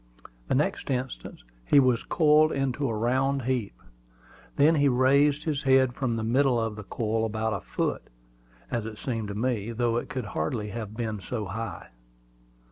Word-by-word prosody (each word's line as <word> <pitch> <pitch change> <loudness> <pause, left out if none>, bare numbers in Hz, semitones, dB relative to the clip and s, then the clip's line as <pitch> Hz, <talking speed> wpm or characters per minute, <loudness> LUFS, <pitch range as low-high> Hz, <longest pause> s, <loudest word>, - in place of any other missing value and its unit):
The - - +1
next - - -1
instant 130 -1 -4 0.2
he 140 - +5
was 130 -3 +3
coiled 155 -1 +4
into 135 0 -1
a 115 - -2
round 130 +4 +1
heap. 120 - -2 0.8
Then 150 +3 +5
he 145 -3 +3
raised 140 +3 +3
his 150 -3 -1
head 130 -2 +4
from 125 -3 -1
the 110 - -2
middle 125 +2 +2
of 110 -1 -2
the 105 - -8
coil 110 +2 -2
about 110 0 -1
a 100 - -3
foot, - - -3 0.6
as 115 -3 -2
it 110 -1 -8
seemed 115 -4 -3
to 100 - -5
me, 115 -1 -1
though 115 0 0
it - - -4
could 130 -3 -4
hardly 105 +7 -2
have 110 -1 -6
been 110 -3 -3
so 110 +3 -4
high. 100 -1 -6
120 Hz, 175 wpm, -27 LUFS, 110-135 Hz, 0.8 s, he